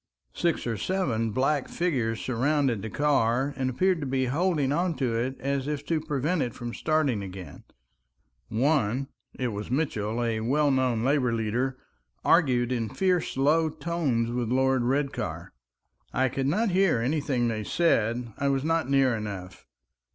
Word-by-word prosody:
Six 170 -2 0
or 115 -2 -2
seven 125 - 0
black 135 +5 0
figures 125 -11 -1
surrounded 130 -2 0
the 110 - -5
car, 135 -1 +1
and 130 -1 -1
appeared 185 +7 +1
to 140 - -3
be 130 0 0
holding 150 0 +1
on 170 +2 0
to 125 -4 -1
it 125 +3 -2
as 140 0 -2
if 150 -1 -3
to 160 -2 0
prevent 155 +2 -1
it 120 - -2
from 120 -1 -6
starting 155 -8 +1
again; 95 -2 -9 0.8
one—it 130 0 -1
was 105 0 -5
Mitchell, 120 -5 -1
a 115 -2 0
well 140 +6 +2
known 130 -4 +1
labor 135 -2 +2
leader—argued 120 - 0
in 115 -3 -1
fierce 180 -6 0
low 155 +4 +3
tones 145 -9 -1
with 120 -2 -2
Lord 130 0 +2
Redcar. 140 +2 -2 0.6
I 130 0 +1
could 135 +1 -2
not 205 +8 +1
hear 190 -5 +3
anything 130 -1 0
they 110 -2 -2
said, 120 -5 +1
I 140 - +1
was 135 -1 +1
not 165 -2 0
near 135 -3 +3
enough. 100 -4 -7
130 Hz, 150 wpm, -27 LUFS, 115-150 Hz, 0.8 s, low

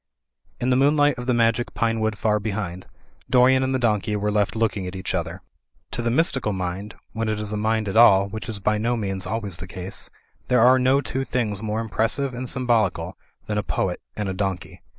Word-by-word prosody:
In 125 +1 0
the - - +4
moonlight 145 0 +3
of 125 - -6
the 125 - +3
magic 115 0 +1
pine 115 -1 0
wood 110 -1 -1
far 105 +1 +1
behind, 100 -4 -4 0.4
Dorian 130 +1 +5
and 130 0 0
the - - +3
donkey 110 -3 0
were 105 0 -1
left 105 0 +1
looking 110 -4 0
at 90 - -6
each 95 0 -4
other. - - -3 0.5
To - - -3
the 120 - 0
mystical 130 -5 +1
mind, 95 +3 -4 0.2
when 115 0 -2
it 110 -1 -1
is 105 0 -3
a - - -1
mind 110 0 0
at 100 - -3
all 100 -4 +7
(which 110 +3 -7
is 110 - -3
by 105 +2 0
no 120 +2 0
means 95 -3 -2
always 100 -4 -2
the 90 +3 -8
case), 90 +1 -6 0.4
there 125 -2 +3
are 130 +2 +6
no 130 +2 +3
two 135 -1 -3
things 110 -6 -2
more 110 0 -2
impressive 115 +5 0
and 125 +1 -3
symbolical 110 -9 +1 0.3
than 105 -1 -1
a - - +1
poet 90 -2 -2 0.2
and 105 -1 -2
a 95 - -2
donkey. 95 -3 -4
110 Hz, 215 wpm, -23 LUFS, 100-120 Hz, 0.5 s, all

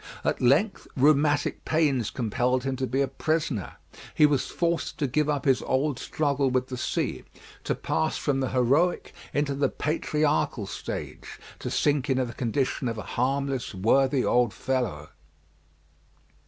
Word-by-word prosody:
At - - -1
length 155 - +2
rheumatic 145 +1 +3
pains 145 -8 +1
compelled 125 +2 0
him 135 0 -1
to 130 0 -1
be 135 +3 0
a 140 - +2
prisoner; 155 - -2 0.4
he 150 - +6
was 145 -3 +1
forced 170 -1 -1
to 150 - 0
give 150 +3 0
up 145 -3 -1
his 135 -2 +3
old 135 0 0
struggle 140 -3 0
with 130 0 0
the 130 - -4
sea, - - -2 0.4
to - - 0
pass 160 - -1
from 140 -2 0
the 130 - -1
heroic 135 +8 +1 0.2
into 145 -1 0
the 140 +1 +1
patriarchal 150 -6 0
stage, - - -6 0.2
to - - -4
sink 145 -1 +1
into 130 -1 +2
the 120 - -7
condition 125 +3 -1
of 115 -1 -3
a 110 - -5
harmless, 135 -2 -1
worthy 130 +7 +2
old 120 -3 +2
fellow. 115 - -2
135 Hz, 155 wpm, -26 LUFS, 125-145 Hz, 0.4 s, he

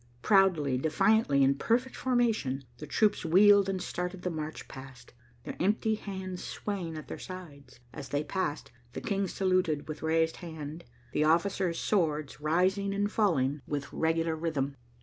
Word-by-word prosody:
Proudly, 175 -10 +3
defiantly, 160 - +3
in 135 +1 +5
perfect 240 - 0
formation, 225 - 0 0.2
the 150 - -7
troops 210 +7 +2
wheeled 195 +4 +6
and 190 -1 -1
started 180 +1 -4
the 180 - -1
march 155 -1 -5
past, 130 -3 -12 0.3
their - - -6
empty 215 +4 +1
hands 190 -3 -5
swaying 180 -6 -4
at 155 - -8
their - - -7
sides. 145 -9 -10
As 135 - -8
they 145 +1 0
passed, 185 -3 -3 0.2
the - - -5
King 200 -2 -1
saluted 185 -5 0
with 155 -1 -6
raised 160 +1 +1
hand, 160 -1 -8 0.3
the 150 - +1
officers' 170 +1 +2
swords 155 -7 0
rising 190 +6 +1
and 205 +1 0
falling 150 -10 +1
with 145 -1 -4
regular 165 0 +1
rhythm. 150 -4 -2
165 Hz, 150 wpm, -30 LUFS, 150-195 Hz, 0.3 s, wheeled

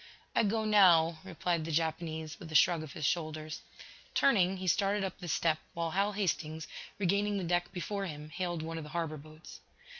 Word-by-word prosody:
"I - - +5
go 220 +1 +1
now," 170 -6 +5
replied 175 -2 -1
the 165 - -4
Japanese, 160 0 -2
with 165 -5 -9
a - - -5
shrug 170 +2 +5
of 155 -3 -8
his 155 - -3
shoulders. 155 -1 -2 0.5
Turning, 195 -8 +4
he 185 - -5
started 195 +3 +2
up 190 - -4
the 180 - -7
step, 160 -1 +1 0.2
while 165 -1 -1
Hal 200 +3 +1
Hastings, 160 -5 -2 0.3
regaining 200 +1 +1
the 190 - -2
deck 175 0 0
before 195 +2 -3
him, 150 -2 -7
hailed 175 -2 -3
one 165 0 -4
of - - -6
the 150 - -9
harbor 160 -2 -2
boats. 155 +2 -12
170 Hz, 190 wpm, -32 LUFS, 155-190 Hz, 0.5 s, I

